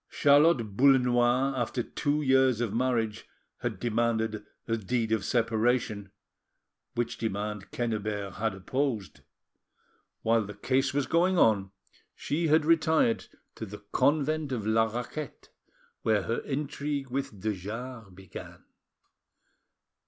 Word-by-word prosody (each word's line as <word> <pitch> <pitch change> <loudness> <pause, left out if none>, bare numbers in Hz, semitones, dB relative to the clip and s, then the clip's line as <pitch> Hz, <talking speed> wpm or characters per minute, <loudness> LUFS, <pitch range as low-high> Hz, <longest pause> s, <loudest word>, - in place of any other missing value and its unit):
Charlotte 140 -7 +4
Boullenois, 125 0 +4
after 120 0 -1
two 150 +4 -1
years 130 -3 +4
of 115 -4 -1
marriage, 115 -3 -1 0.3
had - - -3
demanded 110 -2 0 0.2
a 115 - +1
deed 115 +1 -1
of 110 -3 +1
separation, 115 -3 0 0.9
which 120 0 -2
demand 105 -2 -3
Quennebert 105 -4 -3
had 110 -1 -1
opposed. 110 - -2 1.0
While 115 -1 +2
the 105 - -8
case 130 +1 +1
was 140 0 0
going 180 +3 +2
on 100 - +3 0.5
she 165 +3 -1
had 155 0 +4
retired 160 -6 +3 0.3
to - - -8
the 105 +1 -10
convent 155 0 +1
of 115 -5 -3
La 110 +1 +3
Raquette, 120 +5 -6 0.5
where 110 -3 +2
her 115 +6 -1
intrigue 140 -1 -3
with 130 -6 -3
de 110 +3 -1
Jars 110 +3 -7
began. 95 -1 -11
120 Hz, 120 wpm, -28 LUFS, 110-135 Hz, 1.0 s, Charlotte